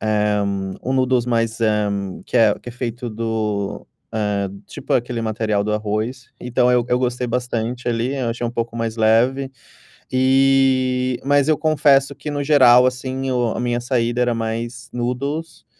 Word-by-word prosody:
eh, 105 -1 +1 0.4
um 130 - -2
noodles 130 -2 +2
mais, 115 -1 0
eh, 105 -2 +2 0.4
que - - -2
é 110 -3 +5
que - - -11
é - - -7
feito 120 0 -5
do, 110 -2 -3 0.3
eh 105 -2 -1 0.2
tipo - - -6
aquele 120 -1 0
material 110 -2 -1
do 105 - -1
arroz. 110 +4 -3
Então, 125 0 +1
eu 125 -1 +3
eu 125 - +2
gostei 125 0 -1
bastante 120 0 -2
ali, 120 +3 -1
eu 125 -3 -1
achei 120 +1 -4
um - - -3
pouco 115 -1 -4
mais 115 -1 -3
leve. 120 +5 +2 0.6
E, 130 -1 +3
mas 145 0 +3
eu 155 -1 +3
confesso 145 -3 +3
que, 150 - -7
no 145 0 -2
geral, 130 -4 +6
assim, 130 +1 -2
o 120 -2 +1
a - - -3
minha 120 0 0
saída 120 -1 0
era 120 -1 +2
mais 115 +2 -4
noodles, 140 +7 -4
120 Hz, 165 wpm, -20 LUFS, 115-130 Hz, 0.6 s, geral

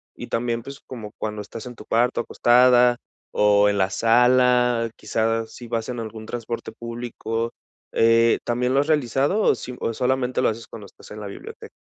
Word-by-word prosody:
y - - -8
también 115 0 -2
pues 140 0 -9
como 110 -5 -8
cuando 105 -1 -4
estás 115 +4 -9
en 125 - -9
tu 105 - -13
cuarto 120 +2 +1
acostada 125 0 +4 0.4
o 105 0 +4
en 100 - 0
la 95 0 +2
sala, 125 0 +3
quizás 115 0 -1
si 120 - -10
vas 115 -1 -3
en 120 -1 -4
algún 110 0 -7
transporte 115 0 -5
público, 115 -1 -4 0.4
eh, 115 0 +4
¿también 125 +2 0
lo 135 - +3
has 145 - 0
realizado 145 - +1
o - - +4
si 125 - -8
o 115 - -2
solamente 130 +1 0
lo - - +3
haces 115 +1 -5
cuando 105 -3 -10
estás - - -17
en 105 - -8
la 105 - -6
biblioteca? 100 - -10
115 Hz, 190 wpm, -23 LUFS, 115-125 Hz, 0.4 s, acostada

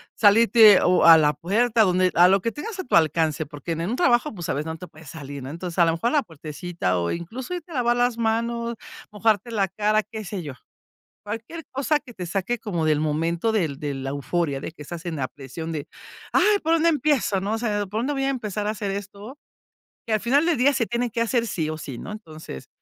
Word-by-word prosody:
salirte 215 -1 +6
o 180 -1 +3
a 165 -1 +10
la 150 -1 +3
puerta 220 - +1
donde 185 -1 +2
a 175 +1 +7
lo 195 0 +3
que 230 - -1
tengas 385 - -7
a - - -2
tu 245 - 0
alcance, 160 -1 +2
porque 145 +3 -7
en 165 - -4
en 175 - -2
un - - 0
trabajo, 255 -4 +2
pues, 175 -5 -6
a - - +1
veces, 145 +3 -3
no 160 0 -4
te 180 - -9
puedes 155 -2 -14
salir, 140 -3 -8
¿no? 130 - -6
Entonces, 170 +2 -6
a 170 - +7
lo 165 - +2
mejor 230 +9 0
a - - -4
la 290 -3 +3
puertecita 155 - -3
o 85 - -1
incluso 235 - -5
irte 345 -1 -7
lavar 240 -2 +1
las 245 -1 +1
mano, 235 +1 -1 0.4
mojarte 220 +1 +1
la 200 -3 +1
cara, 215 +3 +1
qué 220 -1 -8
sé 195 -3 -5
yo. 140 -3 -6 0.7
Cualquier 225 +10 -6
cosa 290 +3 0
que 255 -4 -14
te 180 - -6
saque 195 +7 -2
como 175 -8 -2
del 155 -1 +3
momento 165 +7 0
del 160 -10 -1
de 145 -2 -3
la 135 0 -4
euforia 140 0 -2
de 155 - -6
que 160 - -20
estás 170 +3 -8
en 165 -2 -3
la 130 -2 -2
presión 145 +4 -8
de 150 -3 -4 0.5
"¡Ay! 420 -1 +4
¿Por 325 +1 +1
dónde 330 +1 +3
empiezo, 280 - +1
no?, 200 +3 -2
o - - -1
sea, 210 -3 -1
¿por 210 +4 -3
dónde 280 +5 -1
voy 270 -1 -1
a 275 - +1
empezar 210 -5 -3
a - - +1
hacer 205 -2 -3
esto 200 +6 -7 0.7
que 225 - -3
al 215 - +1
final 280 +7 +2
del 345 - +2
día 270 +4 +4
se 235 -4 0
tienen 240 0 -1
que 230 - -3
hacer 230 0 +1
sí 160 -5 -2
o 155 - -3
sí, 135 -6 -7
no?". 210 - -7
Entonces, 155 - -10
205 Hz, 245 wpm, -24 LUFS, 160-235 Hz, 0.7 s, a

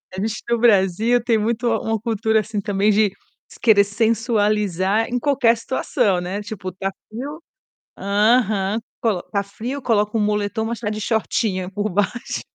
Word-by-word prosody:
A 190 - -3
gente 220 +2 -2
no 235 - +2
Brasil 225 +1 +3
tem 235 -2 +2
muito 230 +2 -1
uma 225 -1 0
cultura, 220 0 +1
assim, 215 -1 -3
também, 200 +1 +1
de 210 -1 +3 0.5
querer 210 -3 +6
sensualizar 210 -2 +1
em 245 - -1
qualquer 250 -4 +3
situação, 215 -5 0
né, 185 +3 -4
tipo, 205 -3 -6
tá 195 +2 -3 0.2
frio 285 +9 -7 0.6
aham. 210 0 +2 0.2
Colo 210 -6 +1
tá 200 -1 -2
frio, 235 +8 -6
coloca 210 -3 +1
um - - +1
moletom, 210 +1 0
mas 230 +1 -3
está 220 -3 -2
de 215 0 -4
shortinho 205 -4 -1
por 205 +2 -2
baixo. 205 +5 -2
215 Hz, 160 wpm, -21 LUFS, 200-230 Hz, 0.6 s, querer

